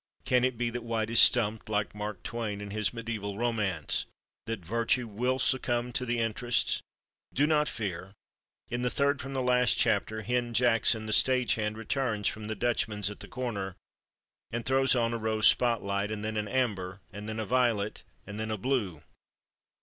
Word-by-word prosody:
Can 125 -1 +3
it 130 -2 0
be 120 0 -1
that 120 0 -5
White 115 -1 -2
is 115 - +6
stumped, 110 -3 +5
like 105 -1 -1
Mark 105 -1 -6
Twain 110 -4 -4
in 105 -1 -7
his 105 -1 +1
mediæval 110 -4 -5
romance—that 105 -2 -3
Virtue 115 +4 0
will 125 +5 -1
succumb 125 -2 +1
to 125 - +1
the 120 0 0
Interests? 115 +1 0 0.5
Do 145 - +3
not 150 -1 +2
fear! 95 -2 -5 0.5
In 120 +1 -2
the 125 - +1
third 140 +2 +1
from 135 +1 -6
the 130 -1 -1
last 125 -1 +3
chapter 110 0 +1
Hen 120 +1 -1
Jackson, 115 -2 +4
the 110 - -1
stagehand, 115 -4 +2
returns 115 -3 -1
from 110 -1 -3
the 110 - -3
Dutchman's 105 -3 -1
at 105 - -10
the - - -8
corner 100 -7 -4 0.7
and 120 0 -4
throws 135 0 +3
on 115 -1 +1
a 115 - -2
rose 110 -1 0
spot 120 -2 +4
light, 100 +1 -1
and 110 -1 -4
then 110 0 -3
an 105 -1 -2
amber, 100 -6 -1
and 105 +2 -7
then 110 0 -4
a 110 - -2
violet, 115 -3 0 0.2
and 100 +2 -7
then 110 0 -3
a 110 - -2
blue. 100 - -2
115 Hz, 180 wpm, -29 LUFS, 105-125 Hz, 0.7 s, is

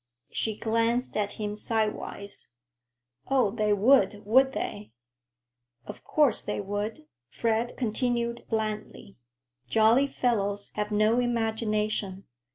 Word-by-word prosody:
She 220 -2 -2
glanced 230 +2 0
at 205 -1 -1
him 210 -1 -4
sidewise. 210 -2 -3 0.8
"Oh, 260 -7 +2
they 210 0 0
would, 210 0 +3
would 265 +5 +4
they?" 205 - -5 0.9
"Of - - -9
course 290 -7 +2
they 210 - -3
would," 205 -3 -4 0.2
Fred 230 - -1
continued 235 0 -1
blandly. 215 - -4 0.5
"Jolly 225 - +4
fellows 205 -6 -1
have 210 0 -2
no 215 +3 +3
imagination. 215 -4 -1
220 Hz, 105 wpm, -27 LUFS, 210-235 Hz, 0.9 s, would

